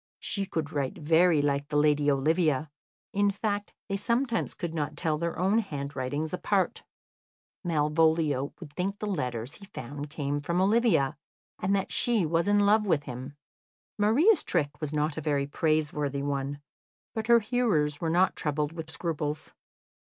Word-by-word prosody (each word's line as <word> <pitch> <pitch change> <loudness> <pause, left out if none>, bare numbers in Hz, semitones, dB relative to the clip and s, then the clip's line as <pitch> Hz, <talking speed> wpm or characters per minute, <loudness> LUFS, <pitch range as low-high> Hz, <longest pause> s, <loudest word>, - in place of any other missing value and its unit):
She 200 -1 -2
could 155 -5 -3
write 140 -3 -2
very 160 0 +4
like 140 0 0
the 150 0 -1
lady 150 -1 +3
Olivia; 150 +1 +1 0.4
in 205 0 +3
fact, 205 0 -2 0.2
they 195 - -1
sometimes 235 +2 0
could 170 -2 -4
not 150 -2 -3
tell 155 -1 0
their 170 0 -2
own 195 +5 +3
handwritings 145 - -3
apart. 190 +1 0 0.8
Malvolio 155 -3 +2
would 155 -5 -10
think 195 +5 -2
the 215 - -4
letters 125 - -2
he 200 - -12
found 145 -4 -7
came 145 -1 -2
from 170 +4 -1
Olivia, 195 - +3 0.4
and 195 +2 +1
that 195 -1 -1
she 235 -7 +2
was 165 +3 +1
in 205 0 +4
love 210 +1 +4
with 155 -6 +2
him. 130 +1 -7 0.6
Maria's 285 - +4
trick 150 -5 0
was 150 -2 -2
not 150 0 -1
a - - -2
very 145 -2 0
praiseworthy 150 -2 0
one, 140 0 -2 0.5
but 220 -1 -3
her 235 0 +7
hearers 205 - 0
were 165 - 0
not 180 +3 +3
troubled 150 -1 -1
with 160 -1 -6
scruples. 155 -2 -3
160 Hz, 160 wpm, -28 LUFS, 145-195 Hz, 0.8 s, her